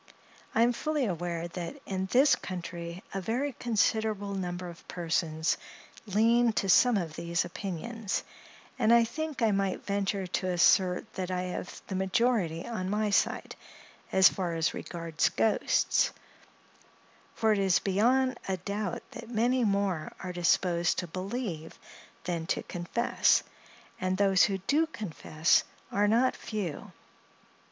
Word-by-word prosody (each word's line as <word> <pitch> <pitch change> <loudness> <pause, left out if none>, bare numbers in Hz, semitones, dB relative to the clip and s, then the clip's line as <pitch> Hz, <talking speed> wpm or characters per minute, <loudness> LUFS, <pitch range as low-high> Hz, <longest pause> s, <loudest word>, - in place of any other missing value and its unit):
I 230 - +5
am 240 +1 +3
fully 300 +1 -1
aware 175 -3 -3
that 180 +11 -6
in 190 -1 -2
this 265 +8 +5
country 170 -1 -6
a 195 - -2
very 255 +8 -1
considerable 220 -3 0
number 180 -1 -4
of 170 -1 -12
persons 165 -2 -1 0.5
lean 230 +3 +3
to 195 - -1
some 240 +4 +6
of 165 -5 -3
these 170 +1 -1
opinions, 200 +3 -4 0.6
and 220 - +4
I 235 0 +7
think 305 +2 -3
I 220 - +4
might 195 -1 -1
venture 200 -1 -1
to 185 +1 -2
assert 180 +1 +3
that 185 -1 -4
I 180 0 -1
have 180 0 -6
the - - -6
majority 190 -3 +1
on 210 -6 -3
my 210 +1 0
side, - - 0 0.6
as 190 0 +7
far 175 -3 -1
as 165 0 +1
regards 165 -2 -1
ghosts—for 220 0 -2
it 205 - 0
is 190 -2 +3
beyond 250 +7 +2
a 190 -1 -1
doubt 200 +1 -4
that 235 -3 -9
many 245 +2 +2
more 200 -6 0
are 185 -1 -5
disposed 175 0 +2
to 180 - -1
believe 185 -2 -5 0.5
than 165 -2 -3
to - - -1
confess—and 185 -1 -1
those 195 -2 +5
who 195 -2 -1
do 310 +6 +3
confess, 165 - +1 0.3
are 205 +1 +2
not 240 +5 +3
few. 200 -9 -5
195 Hz, 135 wpm, -29 LUFS, 175-225 Hz, 0.6 s, I